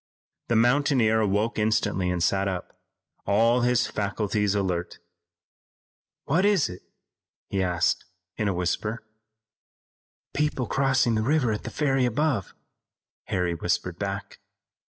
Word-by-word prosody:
The 115 - +1
mountaineer 120 -2 +3
awoke 105 +2 0
instantly 105 -3 +1
and 90 -2 -1
sat 95 +2 +1
up, 95 -2 -5 0.5
all 115 +4 +3
his 125 0 +2
faculties 105 0 -1
alert. 90 -3 -2 1.3
"What 165 +6 +1
is 200 -6 +3
it?" 90 0 -9 0.7
he 95 - 0
asked 90 -2 +1 0.3
in 105 - -1
a 100 - +1
whisper. 105 +6 -2 1.3
"People 150 -4 0
crossing 135 -3 +2
the 110 - +1
river 130 0 +2
at 105 - -4
the - - -3
ferry 135 -4 +1
above," 125 - -1 0.7
Harry 90 -1 -1
whispered 85 - -2
back. - - -5
110 Hz, 120 wpm, -26 LUFS, 95-125 Hz, 1.3 s, mountaineer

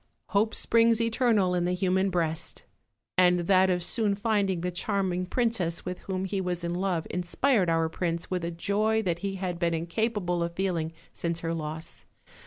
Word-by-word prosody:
213 200 - +4
"Hope 220 +1 -2
springs 230 0 +4
eternal 230 -5 +2
in 175 -1 +1
the 180 - +1
human 190 +1 +1
breast;" 165 -3 -2 0.6
and 180 -1 +5
that 185 +1 +4
of 180 -1 +1
soon 210 +2 +1
finding 200 -4 0
the 180 +1 -2
charming 185 -1 -1
princess 210 -8 0
Avith 180 0 -5
whom 190 -1 -2
he 190 0 -2
was 180 -1 -3
in 170 0 -2
love 180 -2 -1
inspired 180 +3 +1
*&ur 165 0 +2
prince 170 +1 -3
with 180 -2 -1
a 170 - -1
joy 210 +6 0
that 170 -3 -1
he 195 0 -3
had 180 -2 -3
been 170 -1 +1
incapable 175 +1 -1
of 170 0 -2
feeling 170 -4 -1 0.2
since 170 -1 -2
her 165 0 -2
loss. 160 +1 -6
180 Hz, 185 wpm, -28 LUFS, 170-200 Hz, 0.6 s, and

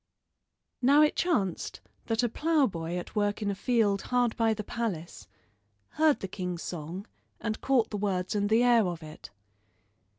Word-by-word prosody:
Now 280 +4 +6
it 300 - +2
chanced 210 - -1 0.3
that 225 +1 +1
a - - +3
ploughboy 230 - 0
at 175 - -7
work 205 0 0
in 200 - 0
a - - -1
field 205 -2 +1
hard 245 -2 +2
by 225 -2 +2
the 210 - -5
palace 195 -7 -4 0.6
heard 310 -2 +2
the 195 - -3
king's 180 -2 -5
song 175 +4 -6 0.3
and 220 -1 -3
caught 250 -5 +2
the 210 - -2
words 190 -3 -1
and 205 -1 0
the 225 +2 +4
air 235 -5 +5
of 170 -2 -5
it. 155 -7 -10
210 Hz, 165 wpm, -29 LUFS, 185-245 Hz, 0.6 s, Now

